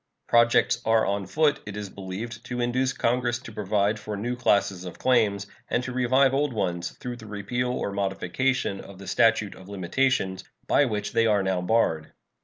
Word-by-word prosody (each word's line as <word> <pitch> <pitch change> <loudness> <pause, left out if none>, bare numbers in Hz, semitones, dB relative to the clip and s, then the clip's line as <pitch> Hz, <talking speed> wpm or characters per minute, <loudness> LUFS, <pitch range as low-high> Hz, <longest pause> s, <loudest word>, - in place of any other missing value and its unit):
Projects 115 0 +4
are 110 0 +3
on 100 -1 -1
foot, 150 -2 +2
it 105 0 -6
is 105 -2 -6
believed, 100 +4 -7
to 125 -1 -4
induce 125 +2 +1
Congress 120 -1 0
to 125 -2 -11
provide 105 0 0
for 105 0 -5
new 120 +4 -2
classes 100 -6 +1
of 90 -2 -8
claims, 110 -6 +2 0.2
and 125 - 0
to 130 - -4
revive 130 +2 +3
old 140 -1 +1
ones 90 -5 -2
through 125 -1 -6
the 110 - -11
repeal 105 +4 -2
or 115 - -2
modification 100 +4 -1
of 100 - -12
the 100 - -10
statute 110 -1 +2
of 95 +1 -14
limitations, 95 0 0 0.2
by 145 - +4
which 105 -4 -2
they 115 0 +3
are 105 -2 +3
now 95 -1 0
barred. 90 -5 +1
110 Hz, 185 wpm, -26 LUFS, 100-125 Hz, 0.2 s, Projects